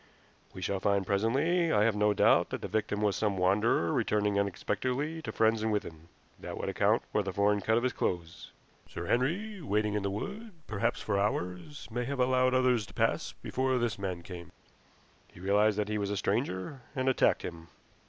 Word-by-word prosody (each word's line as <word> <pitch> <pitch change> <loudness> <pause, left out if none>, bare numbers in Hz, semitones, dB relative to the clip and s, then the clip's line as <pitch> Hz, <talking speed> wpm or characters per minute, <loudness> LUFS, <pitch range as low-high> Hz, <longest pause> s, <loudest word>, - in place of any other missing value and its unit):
We 95 - -8
shall 95 +2 -1
find 100 0 +1
presently, 140 - +1
I 105 - +4
have 110 -1 +2
no 105 0 +3
doubt, - - +4
that - - -5
the - - -2
victim 105 -1 -1
was 105 -2 +2
some 105 -3 0
wanderer 95 -2 +2
returning 105 -1 +1
unexpectedly 130 - -2
to - - -5
friends 110 0 +2
in 110 - 0
Withan. 85 -6 -3 0.3
That - - -7
would - - -3
account - - +2
for 105 - +2
the 100 -1 -3
foreign 100 +1 +2
cut 110 +2 +2
of 120 - 0
his 130 - +1
clothes. 85 -2 -3 0.4
Sir 85 - -6
Henry, 180 - 0
waiting 105 -6 0
in 105 - 0
the 100 - -1
wood, 200 - -5
perhaps 100 -2 -1
for 100 -2 0
hours, 100 +6 -3
may 120 +1 -2
have 140 0 -4
allowed 130 0 +3
others 125 -4 +2
to - - -15
pass - - 0
before 130 0 0
this 120 -4 -1
man 90 -3 -4
came. 85 -1 -9 0.8
He - - -17
realized 100 +3 +2
that 105 -1 0
he 105 0 -1
was 100 -1 -2
a 100 - -2
stranger, 105 +4 -2
and 130 -1 -1
attacked 130 - +3
him." 85 -1 -7
105 Hz, 195 wpm, -30 LUFS, 100-130 Hz, 0.8 s, I